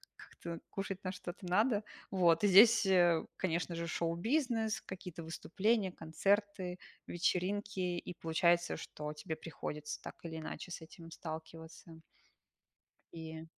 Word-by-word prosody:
Как-то 170 -1 -8
кушать 195 0 -4
на 185 - -2
что-то 180 +1 -7
надо. 210 +4 +3 0.3
Вот. 175 -2 +4
И - - +6
здесь, 220 +4 +8
э, 175 -3 +5
конечно 170 -1 -1
же, 170 0 -2
шоу-бизнес, 220 - 0
какие-то 180 -2 -8
выступления, 190 +5 0
концерты, 185 +2 0 0.3
вечеринки, 190 +3 0
и 180 0 -2
получается, 170 +1 +2
что 150 0 -6
тебе 160 +1 -5
приходится, 150 -2 -6
так - - -8
или 160 -1 -5
иначе, 160 +2 -6
с 170 - -5
этим 165 0 -12
сталкиваться. 160 +1 -8 1.1
И 160 0 -7
175 Hz, 125 wpm, -35 LUFS, 165-195 Hz, 1.1 s, здесь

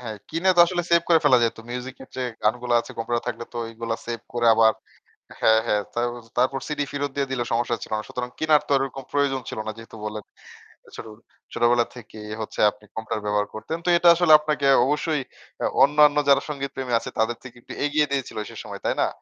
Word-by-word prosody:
হ্যাঁ, 110 -3 -6
কিনে 165 +4 0
তো - - +7
আসলে 175 0 -1
সেভ 170 0 +5
করে 165 -2 +6
ফেলা 130 -4 +6
যাইত। 115 - 0
মিউজিকের 130 +1 -7
যে 130 - -2 0.2
গানগুলা 120 +3 +1
আছে - - -11
কম্পিউটার 120 +1 -2
থাকলেতো 120 +1 -6
ঐগুলা 115 0 -4
সেভ 115 -2 -4
করে 120 0 0
আবার 110 0 +5 0.7
হ্যাঁ, 110 0 +5
হ্যাঁ, 105 -2 +1
তারপ 120 +1 -1 0.3
তারপর 130 +2 +2
সিডি 150 -2 -1
ফিরত 145 0 -2
দিয়ে 140 -1 -1
দিলেও 125 -2 -2
সমস্যা 120 0 0
ছিল - - -8
না। - - -4
সুতরাং 125 0 -4
কিনারতো 155 -2 +2
ওরকম 135 0 -3
প্রয়োজন 140 -2 +1
ছিল - - -6
না 110 - -2
যেহেতু 115 0 -12
বলেন। 105 0 -5 0.7
ছোটবে 110 0 -10 0.3
ছোটবেলা 120 0 +3
থেকেই 105 -2 -10
হচ্ছে - - -6
আপনি 105 +1 -21
কম্পিউটার 110 -1 -4
ব্যবহার 105 0 0
করতেন 160 +9 -5
তো - - -2
এটা 175 - +4
আসলে 175 -2 +4
আপনাকে 150 -2 -1 0.2
অবশ্যই 150 +1 0 0.4
আ - - +3 0.2
অন্যান্য 150 +1 +5
যারা 140 0 +5
সংগীতপ্রেমী 135 -3 -4
আছে - - -7
তাদের 115 +2 +1
থেকে 130 -2 -12
একটু - - -9
এগিয়ে 150 0 +2
দিয়েছিল 135 -2 -3
সে - - -12
সময়, - - -8
তাই - - +1
না? - - +2
125 Hz, 200 wpm, -24 LUFS, 115-145 Hz, 0.7 s, তো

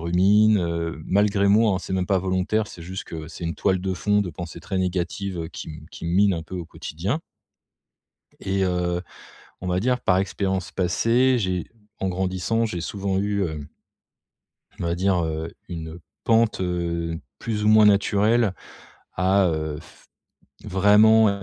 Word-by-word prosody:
rumine, 100 +5 +4
heu, 85 -2 -2
malgré 100 +1 +2
moi, 105 -1 +4
hein. - - -1
C'est 95 - -7
même 90 -1 0
pas 95 - +2
volontaire, 95 +4 0
c'est 85 - -11
juste 95 +3 -6
que, 80 -1 -7
c'est 85 - -8
une 85 - -2
toile 95 -2 +1
de 95 0 -2
fond 105 +2 +1
de 90 - -5
pensées 85 +2 -8
très 95 -2 -3
négatives, 90 -1 -2
qui - - -8
me 75 0 -10
qui 85 - -8
me 85 - -1
mine 100 +1 +4
un 80 - -4
peu 90 +3 -8
au 85 - -4
quotidien 95 - -4 1.2
et 95 0 -1
heu, 90 -1 0 0.6
on 90 - -5
va 90 0 +1
dire 125 +4 +1
par 90 - +3
expérience 95 -1 -2
passée, 115 +8 +2
j'ai 90 -4 -2 0.3
en 95 - -1
grandissant, 95 +5 0
j'ai 90 -6 -4
souvent 95 +1 -2
eu, 100 0 0
heu 75 -4 -4 1.1
on - - -3
va 85 0 0
dire, 90 -1 +1
heu, 80 +1 -4 0.2
une 80 -1 -6 0.2
pente, 115 -3 +2
heu, 85 -2 -2 0.2
plus 105 -2 -3
ou - - +2
moins 110 0 +7
naturelle 105 +1 +3 0.6
à, 95 +2 +3
heu, 80 -2 -2
f - - -19 0.6
vraiment 105 +1 +5
95 Hz, 170 wpm, -24 LUFS, 85-105 Hz, 1.2 s, moins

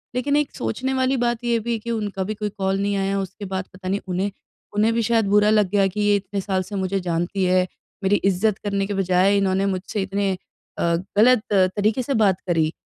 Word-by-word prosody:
लेकिन 285 +3 +1
एक 295 -1 0
सोचने 260 - -2
वाली 260 0 +1
बात 240 0 0
ये 235 -1 +2
भी 235 +2 -4
है 230 - -1
कि 235 +2 -5
उनका 205 -4 -2
भी 215 +3 -3
कोई 210 0 -3
कॉल 195 -1 -1
नहीं 200 0 0
आया 195 0 0
उसके 195 +2 -6
बाद 190 0 -3
पता 185 0 -9
नहीं 200 +1 0
उन्हें 185 +2 -1 0.4
उन्हें 220 +2 +3
भी 230 - +1
शायद 225 -1 +2
बुरा 210 +1 +4
लग 210 -3 +3
गया 200 0 +3
कि 210 +3 -3
ये 205 0 +4
इतने 200 0 -3
साल 190 -1 -1
से 200 +3 -8
मुझे 195 0 -1
जानती 175 +2 -1
है, 185 0 +3 0.4
मेरी 195 +2 +3
इज़्ज़त 195 +2 +1
करने 200 -1 0
के 205 - -3
बजाए 190 +1 +3
इन्होंने 195 0 +1
मुझसे 195 +2 -2
इतने 195 0 -1
अ, 180 - -9 0.3
गलत 240 0 +5
तरीके 205 +5 +2
से 275 - -2
बात 205 -6 +2
करी। 160 -2 +2
200 Hz, 225 wpm, -22 LUFS, 190-215 Hz, 0.4 s, गलत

